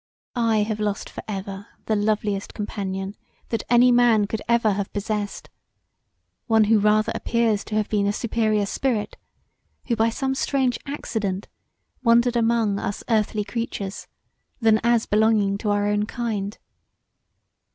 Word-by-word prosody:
I 225 Hz, -3 st, +2 dB
have 215 Hz, 0 st, -3 dB
lost 210 Hz, -1 st, -2 dB
for -, -, -7 dB
ever 195 Hz, -1 st, -5 dB, 0.2 s
the 220 Hz, -, +1 dB
loveliest 205 Hz, -1 st, -1 dB
companion 195 Hz, -2 st, -4 dB, 0.4 s
that 230 Hz, -, -1 dB
any 245 Hz, +1 st, +6 dB
man 240 Hz, -3 st, +4 dB
could 215 Hz, +1 st, -4 dB
ever 235 Hz, -2 st, +3 dB
have 200 Hz, 0 st, -2 dB
possessed, 205 Hz, 0 st, -3 dB, 1.0 s
one 225 Hz, -2 st, +5 dB
who 215 Hz, +1 st, +4 dB
rather 215 Hz, +1 st, +3 dB
appears 230 Hz, -3 st, 0 dB
to 215 Hz, -, -4 dB
have 215 Hz, -1 st, +1 dB
been 205 Hz, -2 st, +1 dB
a -, -, +2 dB
superior 215 Hz, -1 st, 0 dB
spirit 225 Hz, 0 st, -1 dB, 0.7 s
who 240 Hz, -, 0 dB
by 225 Hz, +1 st, +2 dB
some 265 Hz, +3 st, -1 dB
strange 265 Hz, -2 st, 0 dB
accident 210 Hz, -9 st, -3 dB, 0.5 s
wandered 235 Hz, 0 st, +4 dB
among 225 Hz, -3 st, +2 dB
us 200 Hz, -, -4 dB
earthly 215 Hz, -1 st, +1 dB
creatures, 205 Hz, -3 st, -5 dB, 0.5 s
than 220 Hz, -2 st, +4 dB
as 235 Hz, -1 st, +3 dB
belonging 210 Hz, -2 st, +2 dB
to 210 Hz, -, -2 dB
our 205 Hz, 0 st, +1 dB
kind. 215 Hz, -3 st, -3 dB
215 Hz, 140 wpm, -23 LUFS, 205-230 Hz, 1.0 s, any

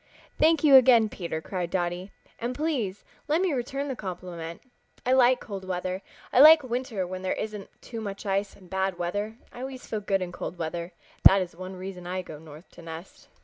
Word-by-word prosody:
"Thank 320 Hz, 0 st, +4 dB
you 280 Hz, -3 st, +9 dB
again, 235 Hz, -4 st, +6 dB
Peter," 170 Hz, -5 st, -4 dB
cried 180 Hz, 0 st, -3 dB
Dotty, 175 Hz, +1 st, -2 dB, 0.3 s
"and 240 Hz, +2 st, -3 dB
please 255 Hz, -11 st, -2 dB, 0.2 s
let 310 Hz, +2 st, +2 dB
me 370 Hz, -4 st, +1 dB
return 275 Hz, +2 st, -2 dB
the 265 Hz, -, -3 dB
compliment. 175 Hz, -5 st, -7 dB, 0.4 s
I 250 Hz, -, +2 dB
like 255 Hz, -1 st, +5 dB
cold 200 Hz, -4 st, -7 dB
weather. 185 Hz, 0 st, -3 dB, 0.3 s
I -, -, +5 dB
like 305 Hz, +1 st, +10 dB
winter 245 Hz, -5 st, -2 dB
when 185 Hz, +1 st, -6 dB
there 185 Hz, -, 0 dB
isn't 210 Hz, -2 st, -5 dB
too 230 Hz, -2 st, -6 dB
much 200 Hz, 0 st, -6 dB
ice 195 Hz, 0 st, -1 dB
and 185 Hz, -, -17 dB
bad 190 Hz, 0 st, -1 dB
weather. 205 Hz, +5 st, -3 dB, 0.2 s
I -, -, -10 dB
always 260 Hz, 0 st, -6 dB
feel 215 Hz, -, -3 dB
good 195 Hz, -2 st, 0 dB
in 175 Hz, -, -6 dB
cold 180 Hz, -, -6 dB
weather. 170 Hz, +1 st, -4 dB, 0.3 s
That 195 Hz, -, +9 dB
is 180 Hz, -3 st, -4 dB
one 185 Hz, +2 st, -7 dB
reason 185 Hz, -1 st, -7 dB
I 185 Hz, +1 st, -3 dB
go 155 Hz, -4 st, -9 dB
north 155 Hz, +2 st, -13 dB
to -, -, -13 dB
nest." 165 Hz, +2 st, -10 dB
195 Hz, 200 wpm, -27 LUFS, 180-245 Hz, 0.4 s, like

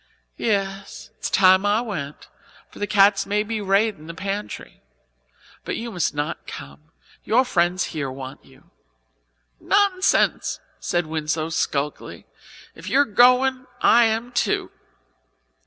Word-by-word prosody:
"Yes, 195 Hz, -3 st, -3 dB
it's -, -, -3 dB
time 190 Hz, 0 st, +5 dB
I 205 Hz, +1 st, +2 dB
went, 160 Hz, -12 st, -6 dB, 0.4 s
for -, -, -13 dB
the 205 Hz, -, -2 dB
cats 195 Hz, 0 st, +4 dB
may 210 Hz, +1 st, +1 dB
be 215 Hz, 0 st, -4 dB
raidin' 195 Hz, -4 st, 0 dB
the 170 Hz, -, -8 dB
pantry. 200 Hz, +3 st, -6 dB, 0.8 s
But -, -, -3 dB
you 230 Hz, +1 st, -5 dB
must 175 Hz, -6 st, -1 dB
not 145 Hz, -, -4 dB
come; 70 Hz, +2 st, -10 dB, 0.3 s
your 255 Hz, +4 st, +3 dB
friends 175 Hz, -5 st, +1 dB
here 145 Hz, -4 st, -3 dB
want 130 Hz, 0 st, -9 dB
you." -, -, -22 dB, 0.9 s
"Nonsense!" 390 Hz, -2 st, +2 dB, 0.2 s
said 175 Hz, -2 st, -1 dB
Winslow 155 Hz, 0 st, -2 dB
sulkily. 150 Hz, -2 st, -3 dB, 0.5 s
"If -, -, -9 dB
you 275 Hz, -, +3 dB
are -, -, +3 dB
going 255 Hz, +3 st, +3 dB
I 235 Hz, 0 st, +5 dB
am 225 Hz, +2 st, -1 dB
too." 240 Hz, -, -1 dB
195 Hz, 130 wpm, -22 LUFS, 160-225 Hz, 0.9 s, time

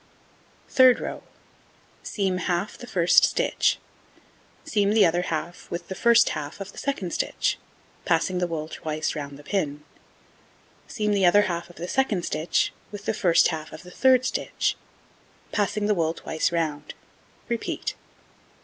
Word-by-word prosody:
Third 255 Hz, -2 st, +6 dB
row: -, -, -5 dB, 0.8 s
Seam 190 Hz, -3 st, -1 dB
half 180 Hz, +3 st, -1 dB
the 245 Hz, -, -10 dB
1st 175 Hz, -6 st, +4 dB
stitch, -, -, +2 dB, 0.9 s
seam 205 Hz, -1 st, +1 dB
the 215 Hz, -3 st, +6 dB
other 175 Hz, +1 st, +2 dB
half 175 Hz, 0 st, -4 dB
with 175 Hz, 0 st, -6 dB
the -, -, -3 dB
1st 235 Hz, +3 st, +5 dB
half 150 Hz, +1 st, -5 dB
of 195 Hz, 0 st, -7 dB
the -, -, -10 dB
2d 260 Hz, -11 st, -2 dB
stitch, -, -, -1 dB, 0.4 s
passing 185 Hz, -2 st, +1 dB
the 180 Hz, -, 0 dB
wool 155 Hz, -2 st, -4 dB
twice 155 Hz, -1 st, -3 dB
round 140 Hz, -2 st, -6 dB
the 145 Hz, -, -14 dB
pin, 150 Hz, -6 st, -2 dB, 1.0 s
seam 210 Hz, -2 st, -1 dB
the 195 Hz, -3 st, +4 dB
other 205 Hz, +4 st, +6 dB
half 170 Hz, -3 st, -3 dB
of 175 Hz, -, -15 dB
the 170 Hz, -, -6 dB
2d 205 Hz, -5 st, 0 dB
stitch 155 Hz, +3 st, 0 dB, 0.2 s
with 205 Hz, -1 st, -8 dB
the -, -, +1 dB
1st 180 Hz, -5 st, +4 dB
half 155 Hz, -2 st, -5 dB
of 155 Hz, -, -10 dB
the 180 Hz, -, -12 dB
3d 255 Hz, +4 st, +4 dB
stitch, -, -, -1 dB, 0.8 s
passing 205 Hz, 0 st, 0 dB
the 210 Hz, -, +3 dB
wool 165 Hz, -3 st, 0 dB
twice 160 Hz, -, -1 dB
round; 155 Hz, -3 st, -2 dB, 0.5 s
repeat. 235 Hz, -1 st, -3 dB
180 Hz, 155 wpm, -25 LUFS, 160-205 Hz, 1.0 s, Third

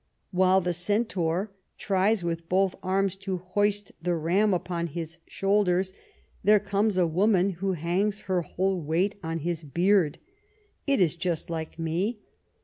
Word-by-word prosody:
While 185 Hz, 0 st, +4 dB
the 175 Hz, 0 st, -1 dB
centaur 190 Hz, -1 st, 0 dB, 0.3 s
tries 195 Hz, +1 st, +1 dB
with 165 Hz, -1 st, -3 dB
both 190 Hz, 0 st, +2 dB
arms 195 Hz, 0 st, 0 dB
to 195 Hz, -1 st, -3 dB
hoist 205 Hz, +3 st, -1 dB
the 175 Hz, +1 st, 0 dB
ram 180 Hz, +6 st, +2 dB
upon 175 Hz, -2 st, -1 dB
his 165 Hz, +1 st, -6 dB
shoulders, 195 Hz, -2 st, +1 dB, 0.5 s
there 210 Hz, +1 st, +6 dB
comes 200 Hz, 0 st, 0 dB
a 180 Hz, -, +4 dB
woman 190 Hz, +3 st, +2 dB
who 190 Hz, +2 st, -2 dB
hangs 185 Hz, +5 st, -1 dB
her 185 Hz, -2 st, 0 dB
whole 185 Hz, +3 st, -1 dB
weight 170 Hz, +7 st, +1 dB
on 165 Hz, 0 st, -3 dB
his 170 Hz, 0 st, -2 dB
beard. 170 Hz, +2 st, +2 dB, 0.7 s
It 275 Hz, -7 st, +3 dB
is 175 Hz, -2 st, +3 dB
just 170 Hz, -1 st, -2 dB
like 160 Hz, -1 st, -5 dB
me. 170 Hz, +8 st, -1 dB
185 Hz, 145 wpm, -27 LUFS, 170-200 Hz, 0.7 s, there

